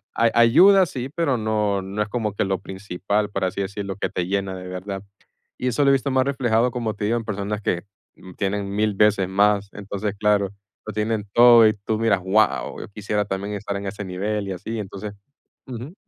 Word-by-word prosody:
a 115 -1 +3
ayuda, 185 +12 +7
sí, 130 -1 -5
pero 150 -7 +1
no 105 -2 0
no 100 +2 -4
es 105 - -1
como 110 -4 -2
que - - 0
lo 95 -1 -1
principal, 100 +2 -3
por 100 -1 -3
así 95 +2 -2
decirlo, 100 0 -4
que - - -2
te 90 - -2
llena 100 -1 -1
de 90 0 -8
verdad. 95 +2 -6 0.5
Y 125 - -2
eso 135 +4 +1
lo 140 - +5
he - - +5
visto 135 +1 0
más 130 0 +2
reflejado, 125 -3 +1
como 115 -3 -2
te 105 - -3
digo, 115 +3 +1
en 115 - -4
personas 105 0 -3
que 85 -3 -1 0.5
tienen 100 0 -2
1000 105 -1 +1
veces 100 -3 +3
más, 100 +1 +2
entonces, 100 0 -4
claro, 105 -2 +2 0.4
lo 110 - -6
tienen 105 0 -1
todo 120 -2 +8
y 110 - +3
tú 110 +2 -3
miras, 110 -4 +2
¡guau! 100 +4 +1
Yo - - -8
quisiera 105 0 -2
también 100 +1 -4
estar 100 0 -4
en 100 - -6
ese 100 +1 -5
nivel 100 +2 -3
y 95 - -3
así, 110 +5 -5
entonces 100 +1 -6 0.5
ujú. 130 +6 -7
105 Hz, 210 wpm, -23 LUFS, 100-115 Hz, 0.5 s, todo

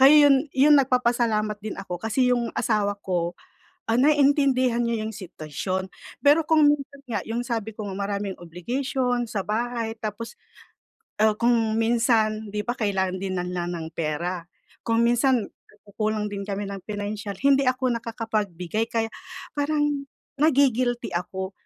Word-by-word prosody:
Kaya 290 +3 +8
'yon 280 +1 +4
'yon 290 +3 +6
nagpapasalamat 235 -5 +1
din 215 0 -5
ako 180 -3 -6
kasi 250 +4 +2
yung 240 -1 0
asawa 205 -2 +1
ko, 175 -2 -1 0.5
ah, 230 - +3
naintindihan 270 -4 +3
niya 230 -2 -1
yung 215 - -3
sitwasyon. 185 -1 -5 0.3
Pero 300 +2 +5
kung 315 -1 +4
minsan 280 -1 -3
nga, 225 - -2
yung 230 +2 -2
sabi 225 -3 -3
ko 205 -2 -5
nga, - - -5
maraming 200 -1 -3
obligation 245 - -2
sa 210 -3 -3
bahay 225 +1 -2
tapos, 225 +2 -6 0.8
ah, 215 -1 +4
kung 230 -1 +2
minsan 225 -2 +2
di 210 +1 -3
ba 240 - -1
kailangan 190 -5 -1
din 190 -1 -3
ng 180 0 -3
ng 175 -1 -2
ng 160 - -5
pera, 170 +3 -2 0.4
kung 230 0 +1
minsan, 240 0 +3 0.2
nagkukulang 210 0 -3
din 200 0 -4
kami 200 +1 -2
ng 200 -1 -6
financial, 205 -1 -4
hindi 275 0 +5
ako 255 0 +1
nakakapagbigay. 220 -3 -2
Kaya 225 -1 -1 0.4
parang 290 -1 0 0.3
nagi-guilty 255 -5 +2
ako, 190 +2 -3
225 Hz, 145 wpm, -25 LUFS, 200-250 Hz, 0.8 s, Kaya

